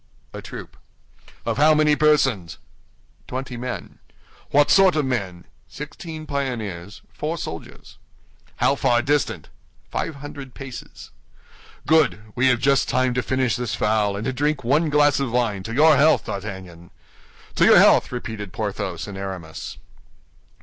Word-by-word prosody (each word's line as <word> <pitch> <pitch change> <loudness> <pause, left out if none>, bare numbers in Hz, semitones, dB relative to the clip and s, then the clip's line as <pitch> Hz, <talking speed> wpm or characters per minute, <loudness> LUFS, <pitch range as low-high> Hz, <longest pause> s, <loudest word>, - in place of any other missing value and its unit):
"A - - -7
troop." - - -10 0.7
"Of - - -1
how 155 +2 +5
many 150 -1 +4
persons?" 135 - +2 0.7
"Twenty 130 0 -5
men." 125 +1 -6 0.5
"What 145 0 +4
sort 190 -3 +6
of 150 -2 +1
men?" 100 -9 -3 0.2
"Sixteen 155 +2 -8
pioneers, 110 - -4
four 160 +3 -3
soldiers." 80 - -9 0.6
"How - - +2
far 120 0 +2
distant?" 145 -1 -1 0.4
"Five 160 - -3
hundred 140 -2 -9
paces." 135 -3 -10 0.7
"Good! 155 -8 +3
We 130 +2 +2
have 125 -2 +3
just 140 +1 +2
time 130 0 +1
to 125 - 0
finish 130 -1 0
this 120 -2 -3
fowl 105 -1 +1
and 105 +2 -4
to 130 - -1
drink 145 +2 -1
one 150 +7 +2
glass 145 -1 +3
of 135 -4 -2
wine 115 -5 0
to 115 - -7
your 155 +1 +6
health, 155 +3 +4
D'Artagnan." 95 -4 -7 0.6
"To - - +3
your - - +7
health!" - - +5
repeated 110 -5 -6
Porthos 100 -4 -4
and 100 - -7
Aramis. 95 -5 -7
125 Hz, 145 wpm, -22 LUFS, 105-145 Hz, 0.7 s, your